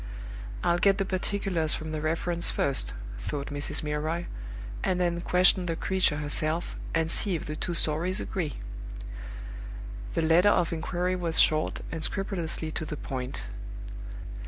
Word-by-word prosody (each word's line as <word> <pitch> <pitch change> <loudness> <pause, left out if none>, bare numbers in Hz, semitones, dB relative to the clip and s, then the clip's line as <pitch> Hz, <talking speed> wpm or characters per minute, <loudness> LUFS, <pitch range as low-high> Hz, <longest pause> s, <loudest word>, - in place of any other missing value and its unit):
"I'll 175 0 +3
get 195 +1 +5
the 195 - +1
particulars 185 -4 +1
from 155 0 -5
the 155 -1 -2
reference 170 +2 +1
first," 140 -1 +2 0.3
thought 140 - -3
Mrs. 145 +2 -1
Milroy, 155 +3 -1 0.6
"and 180 - +2
then 175 -1 +1
question 180 +1 +4
the 165 - 0
creature 185 -3 +2
herself, 155 +3 0 0.2
and 160 0 +2
see 195 -4 +1
if 160 - -3
the 150 - -3
two 170 +2 -2
stories 165 +4 +2
agree." 165 -6 -2 1.6
The 165 - +2
letter 170 +5 +6
of 170 -4 +3
inquiry 180 +3 0
was 170 -3 +2
short, 155 0 +4
and 160 -1 -3
scrupulously 170 -5 -1
to 160 - -2
the 150 -1 -4
point. 130 -1 -3
165 Hz, 145 wpm, -29 LUFS, 155-180 Hz, 1.6 s, letter